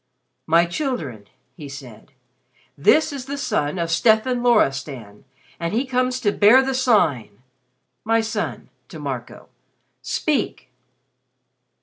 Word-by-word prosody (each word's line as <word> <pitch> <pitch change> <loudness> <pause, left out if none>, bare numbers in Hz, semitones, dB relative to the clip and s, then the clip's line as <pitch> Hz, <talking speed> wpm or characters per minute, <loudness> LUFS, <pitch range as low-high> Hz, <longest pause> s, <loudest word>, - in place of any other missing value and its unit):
"My 165 +2 +4
children," 170 - -4 0.3
he 150 -5 -9
said, 135 -2 -11 0.6
"this 305 - +3
is 265 -3 -6
the 280 +1 -4
son 210 - -1
of 170 -1 -2
Stefan 220 +7 +2
Loristan, 135 - 0 0.3
and 170 +5 -2
he 250 +4 +1
comes 255 0 0
to 205 -4 +2
bear 215 +7 +6
the 270 - -1
Sign. 155 - +1 0.6
My 225 +1 +2
son," 225 -1 -4 0.2
to - - -10
Marco, - - -7 0.5
"speak!" 280 - -2
210 Hz, 115 wpm, -21 LUFS, -, 0.6 s, bear